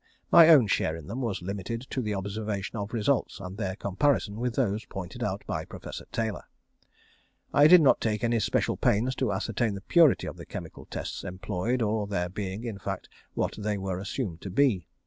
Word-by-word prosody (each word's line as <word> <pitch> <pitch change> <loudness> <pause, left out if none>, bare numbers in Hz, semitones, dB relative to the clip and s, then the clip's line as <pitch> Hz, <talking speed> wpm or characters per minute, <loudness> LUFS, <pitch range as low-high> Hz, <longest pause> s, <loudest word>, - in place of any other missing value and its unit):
My 170 -1 +9
own 145 -8 +8
share 80 -5 0
in 80 -2 -9
them 115 - -5
was 110 -7 -2
limited 100 +5 -4
to 130 - -1
the 105 -3 -2
observation 100 +1 -4
of 105 0 -4
results, 115 -1 0
and 95 -1 -7
their 95 -3 -3
comparison 105 +1 0
with 120 -1 -1
those 110 -4 0
pointed 90 -3 -7
out - - -2
by - - -3
Professor - - -8
Taylor. 110 -5 -2 1.1
I 145 +1 +7
did 180 +1 +9
not 140 - +4
take 105 -1 -1
any 115 0 +2
special 105 - 0
pains 120 +5 +2
to 130 -5 0
ascertain 105 +2 -1
the 100 - -7
purity 160 - +4
of - - -6
the - - -9
chemical - - -8
tests - - -5
employed 95 +6 -2
or 110 0 0
of 100 - -5
their 90 -3 -1
being 95 +2 -5
in 110 -5 -5
fact - - -5 0.3
what - - 0
they 105 0 -1
were 95 -2 -3
assumed 100 -4 -4
to 95 - -6
be. 100 - +2
105 Hz, 200 wpm, -28 LUFS, 95-120 Hz, 1.1 s, My